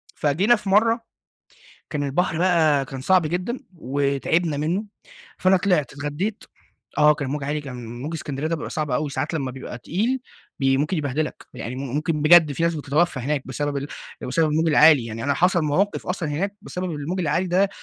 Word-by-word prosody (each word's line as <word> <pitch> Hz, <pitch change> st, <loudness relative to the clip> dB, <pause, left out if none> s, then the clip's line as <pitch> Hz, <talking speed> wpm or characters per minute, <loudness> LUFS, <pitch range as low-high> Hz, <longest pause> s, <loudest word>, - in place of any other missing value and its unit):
فجينا 180 Hz, +11 st, +3 dB
في 210 Hz, -3 st, -6 dB
مرة، 225 Hz, +4 st, +4 dB, 0.9 s
كان 150 Hz, -3 st, -2 dB
البحر 160 Hz, +4 st, 0 dB
بقى 160 Hz, -6 st, +3 dB
كان 135 Hz, -1 st, -7 dB
صعب 185 Hz, +6 st, +4 dB
جدًا 180 Hz, +10 st, -2 dB, 0.2 s
وتعبنا 145 Hz, +3 st, 0 dB
منه، 165 Hz, +8 st, -1 dB, 0.5 s
فأنا 185 Hz, +1 st, +4 dB
طلعت 180 Hz, -7 st, +1 dB
اتغديت، 145 Hz, +10 st, -3 dB, 0.5 s
آه 150 Hz, 0 st, +6 dB
كان 145 Hz, -2 st, -4 dB
الموج 145 Hz, 0 st, -3 dB
عالي 150 Hz, +2 st, -1 dB
كان 125 Hz, -4 st, -8 dB
موج 155 Hz, +4 st, -4 dB
إسكندرية 145 Hz, -2 st, -4 dB
ده 165 Hz, -, 0 dB
بيبقى 155 Hz, -, -6 dB
صعب 155 Hz, -2 st, -2 dB
أوي 145 Hz, +4 st, 0 dB
ساعات 140 Hz, +4 st, -3 dB
لما 135 Hz, -5 st, -2 dB
بيبقى 125 Hz, -1 st, -8 dB
تقيل 225 Hz, -, -1 dB, 0.4 s
بي 135 Hz, 0 st, +3 dB
ممكن 150 Hz, +7 st, 0 dB
يبهدلك، 150 Hz, 0 st, -3 dB
يعني 120 Hz, -, -5 dB
م -, -, -5 dB, 0.2 s
ممكن 155 Hz, 0 st, -1 dB
بجد 160 Hz, -1 st, +7 dB
في 155 Hz, -, -3 dB
ناس 170 Hz, 0 st, +2 dB
بتتوفى 150 Hz, 0 st, 0 dB
هناك 140 Hz, +2 st, -1 dB
بسبب 140 Hz, +1 st, -2 dB, 0.4 s
بسبب 155 Hz, +6 st, +1 dB
الموج 160 Hz, +2 st, +2 dB
العالي. 150 Hz, -4 st, +6 dB
يعني 115 Hz, 0 st, -5 dB
أنا 140 Hz, 0 st, +1 dB
حصل 180 Hz, +1 st, +3 dB
مواقف 185 Hz, +8 st, 0 dB
أصلًا 180 Hz, -3 st, -2 dB
هناك 195 Hz, +8 st, -2 dB
بسبب 185 Hz, -4 st, -4 dB
الموج 160 Hz, +4 st, -3 dB
العالي 170 Hz, +2 st, 0 dB
ده، 185 Hz, +3 st, +3 dB
150 Hz, 180 wpm, -23 LUFS, 140-180 Hz, 0.9 s, بجد